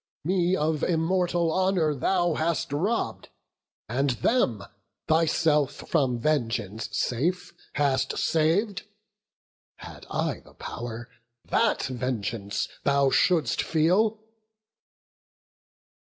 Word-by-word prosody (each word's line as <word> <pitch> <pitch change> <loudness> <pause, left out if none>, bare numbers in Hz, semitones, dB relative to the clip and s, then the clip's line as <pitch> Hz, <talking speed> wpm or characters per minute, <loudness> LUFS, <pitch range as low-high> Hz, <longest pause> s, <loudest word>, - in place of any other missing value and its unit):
Me 180 +2 +2
of 155 -2 0
immortal 175 0 +1
honour 185 -5 +2
thou 175 +4 +1
hast 160 -2 -1
robb'd, 200 +11 -1 0.6
And 135 +5 0 0.2
them, 120 - +2 0.4
thyself 155 -3 +2
from 135 -7 0
vengeance 115 -6 -1
safe, 175 +9 -1 0.2
hast 135 -2 +1
sav'd. 175 +6 +1 0.9
Had - - -11
I - - -1
the - - -20
pow'r, 120 0 -6 0.4
that 230 -1 +1
vengeance 115 -5 -3 0.2
thou 140 -1 +3
shouldst 175 -5 +2
feel." 185 +7 +2
155 Hz, 90 wpm, -26 LUFS, 130-180 Hz, 0.9 s, thou